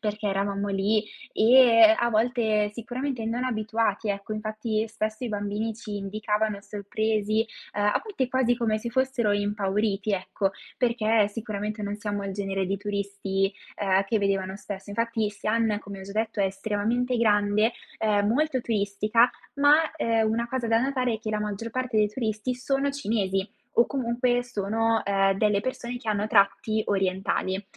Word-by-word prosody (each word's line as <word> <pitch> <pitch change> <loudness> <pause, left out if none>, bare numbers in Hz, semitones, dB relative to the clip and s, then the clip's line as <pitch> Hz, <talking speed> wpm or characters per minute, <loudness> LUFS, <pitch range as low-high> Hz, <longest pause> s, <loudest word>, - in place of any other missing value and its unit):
perché 210 -1 -3
eravamo 200 +1 -1
lì. 205 +2 +1 0.3
E, 230 -2 +7
a 235 0 +1
volte 220 -2 +1
sicuramente, 245 +2 -4
non 235 +3 -1
abituati, 220 -2 -1
ecco, 200 +1 -3
infatti 215 +1 -2
spesso 215 +1 -3
i - - -2
bambini 210 +1 -2
ci 210 -3 -6
indicavano 210 +1 -1
sorpresi, 215 +2 -1 0.3
uhm, 205 0 0
a 210 - +2
volte 395 - -2
quasi 245 -2 +2
come 220 -3 0
se 235 +2 -5
fossero 260 -4 +1
impauriti, 205 0 0
ecco. 195 +1 -1 0.3
Perché 225 -3 +2
sicuramente, 210 -1 -4
non 205 0 -2
siamo 205 -1 -3
il 195 - -4
genere 195 -1 -2
di 195 +1 -1
turisti, 200 -1 -2 0.2
ehm, 195 -1 +2
che 215 +2 0
vedevano 195 -1 -1
spesso. 200 -1 -8
Infatti, 230 0 0
Xi'an, 215 +1 0
come 200 -1 -9
ho - - -8
già 195 - -9
detto, 220 -1 -1
è 195 - +3
estremamente 220 +6 -1
grande, 210 0 +3 0.3
ehm, 205 -2 +2
molto 265 +2 +1
turistica, 215 +2 +2 0.2
ma, 295 +3 +5
ehm, 225 -6 +1
una 235 +1 -1
cosa 255 -2 -2
da 225 0 +3
notare 255 -2 0
è 220 - -4
che 220 - -6
la 210 0 -1
maggior 210 +2 -3
parte 255 -2 -2
dei 210 - +4
turisti 220 +2 -2
sono 275 +2 0
cinesi 200 -7 -1 0.3
o 235 - +6
comunque, 245 -1 0
sono, 225 -1 0
uhm, 195 -1 +2
delle 210 -2 +2
persone 245 0 -4
che 225 - -8
hanno 210 0 +1
tratti 215 +1 +2
orientali. 190 0 0
215 Hz, 160 wpm, -26 LUFS, 200-235 Hz, 0.3 s, E